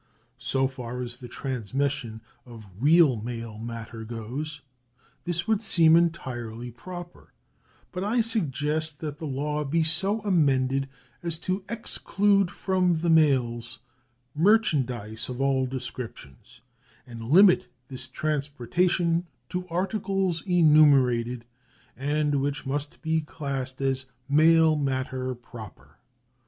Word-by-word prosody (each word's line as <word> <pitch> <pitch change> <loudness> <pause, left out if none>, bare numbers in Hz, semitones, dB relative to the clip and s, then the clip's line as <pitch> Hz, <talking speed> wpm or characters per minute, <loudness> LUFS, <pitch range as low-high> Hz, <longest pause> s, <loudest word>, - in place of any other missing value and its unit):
So 135 +1 +1
far 125 -2 -6
as 120 0 -8
the 125 - -9
transmission 130 -1 -3 0.2
of 115 -4 -12
real 150 -1 +5
mail 115 -1 -6
matter 115 0 -7
goes, 125 +7 -6 0.6
this 175 +2 -1
would 220 -1 +2
seem 165 -6 +5
entirely 125 -8 -1
proper; 175 +8 -10 0.6
but 180 0 -4
I 230 +4 +2
suggest 155 - -1
that 150 -1 -5
the 160 - -4
law 150 +2 -2
be 160 +3 +1
so 190 +7 +1
amended 135 -8 +2 0.3
as 170 -2 -1
to 185 +1 -1
exclude 205 -4 +1
from 185 -2 +1
the 165 +1 +1
mails 125 -7 +2 0.6
merchandise 135 - +1
of 125 0 -5
all 135 -1 +2
descriptions, 125 - -8 0.4
and 120 -3 -9
limit 175 - +5 0.2
this 130 -1 -5
transportation 155 +5 0 0.2
to 180 0 -4
articles 190 0 -1
enumerated, 135 -8 +4 0.5
and 145 0 0
which 145 +1 -2
may 135 +2 0 0.2
be 160 0 +1
classed 140 -4 -5
as 135 -1 0 0.2
mail 160 +2 +5
matter 130 -2 -2
proper. 105 - -13
140 Hz, 115 wpm, -26 LUFS, 125-170 Hz, 0.6 s, real